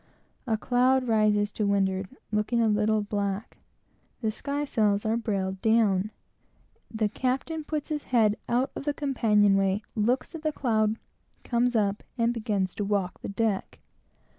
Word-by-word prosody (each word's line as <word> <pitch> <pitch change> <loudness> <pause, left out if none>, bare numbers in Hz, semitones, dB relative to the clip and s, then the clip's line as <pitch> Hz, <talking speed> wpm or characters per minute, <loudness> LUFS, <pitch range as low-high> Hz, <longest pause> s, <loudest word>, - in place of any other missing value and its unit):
A 220 -2 +1
cloud 255 +3 +2
rises 210 -2 +2
to 210 -1 -1
windward, 190 -1 +1 0.2
looking 210 +3 +1
a 230 - +3
little 215 0 +2
black; 205 0 -3 0.6
the 220 -2 0
sky 285 +6 -3
sails 210 -6 +1
are 220 +1 +2
brailed 195 -4 -2
down; 215 -3 +3 0.8
the 220 -1 0
captain 265 +8 -2
puts 300 0 -4
his 300 -2 -3
head 220 -4 +3
out 250 +3 +1
of - - -6
the 290 -1 0
companion 210 -8 +3
way, 195 +2 +1
looks 240 +8 0
at 325 - -7
the 310 -1 0
cloud, 220 -6 +1 0.5
comes 245 0 +1
up, 205 -2 +1 0.2
and 235 0 +2
begins 210 -5 -1
to 205 - -3
walk 200 -3 -1
the - - -5
deck. 200 -1 -1
220 Hz, 155 wpm, -27 LUFS, 205-245 Hz, 0.8 s, a